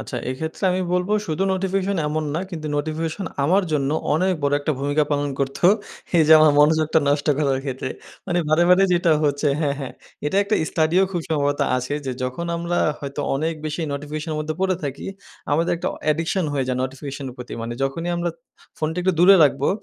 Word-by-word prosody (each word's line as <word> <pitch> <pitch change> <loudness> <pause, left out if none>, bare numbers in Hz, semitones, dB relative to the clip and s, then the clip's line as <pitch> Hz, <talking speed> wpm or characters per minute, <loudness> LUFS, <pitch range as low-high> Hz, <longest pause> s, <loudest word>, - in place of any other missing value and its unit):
আচ্ছা। - - -6
এক্ষেত্রে 160 +8 -5
আমি 185 +1 0
বলবো 180 +3 0
শুধু 155 +4 -1
নোটিফিকেশন 195 +1 -1
এমন 155 +1 -1
না 170 - 0
কিন্তু 160 -4 -6
নোটিফিকেশন 160 +5 -3 0.2
আমার 190 +6 +3
জন্য 140 -2 +1 0.2
অনেক 185 +4 +2
বড় 140 0 +1
একটা 155 - -1
ভূমিকা 145 +2 +1
পালন 145 0 0
করত 135 0 -2 0.6
এই - - +6
যে - - +9
আমার 155 -1 +6
মনোযোগটা 155 +1 +4
নষ্ট 145 +1 +1
করার 135 -3 +1
ক্ষেত্রে। 130 -1 -4 0.4
মানে 175 - 0
বারে, 155 +2 +4
বারে 190 +2 +6
যেটা 175 -1 +3
হচ্ছে 145 +1 +1
হ্যাঁ, 140 -2 +1
হ্যাঁ। 135 - -5 0.3
এটা 190 - -1
একটা 210 - 0 0.2
স্টাডিও 165 +4 +2
খুব 175 - -1
সম্ভবত 145 -2 0 0.2
আছে 130 +3 -3
যে 130 - -1
যখন 130 +7 -3
আমরা 170 +1 -1 0.2
হয়তো 140 +1 -5
অনেক 160 +4 -1
বেশি 155 +3 -3
নোটিফিকেশন 150 +3 -5
এর - - -3
মধ্যে 155 +1 -3
পড়ে 190 -1 +2
থাকি, 140 -1 -5 0.5
আমাদের 165 +3 +2
একটা - - -2
অ - - -12
অ্যাডিকশন 165 +4 0
হয়ে 135 -2 0
যায় 125 - 0
নোটিফিকেশন 135 +1 -5
এর - - -13
প্রতি। 125 0 -9
মানে 115 - -4
যখনই 165 +6 -2
আমরা 175 0 -1 0.5
ফোনটা 160 +3 -2
একটু 185 0 +2
দূরে 195 +2 +8
রাখবো, 140 0 +1
155 Hz, 195 wpm, -22 LUFS, 140-175 Hz, 0.6 s, যে